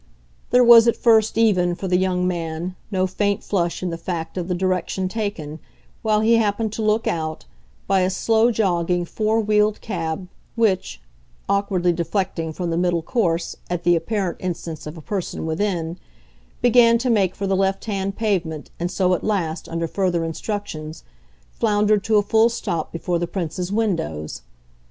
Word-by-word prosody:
There 250 0 +5
was 235 -1 +8
at 235 - +3
first 225 -2 +3
even, 185 -6 +3
for 190 - -5
the 180 - +2
young 180 0 +1
man, 170 0 -3
no 185 -3 +1
faint 200 +2 -1
flush 175 -3 -1
in 180 - -1
the 165 - -5
fact 165 -2 -4
of 180 -2 -3
the 180 - -1
direction 185 +1 -1
taken, 185 -8 -4 0.4
while 215 -1 +2
he 230 +1 +4
happened 215 0 0
to 220 - -3
look 215 +1 +1
out, 155 - -2 0.4
by 195 - +2
a 185 0 +2
slow 225 +4 +2
jogging 175 -5 +1
four 215 +4 0
wheeled 210 -1 +2
cab 175 -3 -4 0.3
which, 190 - 0 0.5
awkwardly 190 -3 +1
deflecting 170 -1 -2
from 175 +1 -3
the 165 - 0
middle 175 -2 +1
course, 170 -7 -1
at 175 -1 -2
the 175 0 +4
apparent 190 0 -2
instance 165 -4 -5
of 150 +2 -8
a - - -9
person 185 -1 -4
within, 170 0 -2 0.6
began 235 -1 +6
to 245 +1 0
make 195 -5 +2
for 200 - -3
the 195 0 +1
left 195 0 0
hand 195 -2 -2
pavement 180 -9 -2
and 175 +1 -1
so 185 0 +1
at 180 - -1
last, 175 -6 -2
under 165 0 -2
further 175 -1 0
instructions, 165 -3 -5 0.5
floundered 210 - +2
to 220 -1 +3
a 205 - +4
full 220 +3 +4
stop 170 -8 -3
before 170 +1 -2
the 175 - -2
Prince's 180 0 -4
windows. 165 - -2
185 Hz, 170 wpm, -22 LUFS, 170-210 Hz, 0.6 s, was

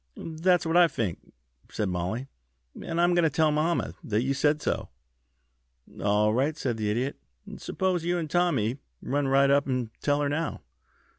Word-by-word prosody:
"That's 165 +2 +1
what 165 +1 +2
I 175 -1 +7
fink," 110 - -4 0.4
said 105 - -2
Mollie, 95 +8 -3 0.6
"and 165 0 -3
I'm 175 +1 +4
goin' 175 - +4
to 160 - +4
tell 155 0 +2
mamma 155 +3 0
that 110 +1 0
you 135 +1 0
said 145 +2 +2
so." - - -2 1.1
"All 105 +1 +3
right," 140 +6 0
said 120 -6 -2
the 105 -1 -1
Idiot. 125 +6 -1 0.4
"Suppose 185 -3 -1
you 175 +1 0
and 165 -2 -2
Tommy 150 -8 +1 0.2
run 145 0 0
right 135 +1 +4
up 140 0 +3
and 125 -4 -2
tell 145 0 +1
her 145 - +1
now." 160 +3 -2
145 Hz, 170 wpm, -27 LUFS, 120-165 Hz, 1.1 s, I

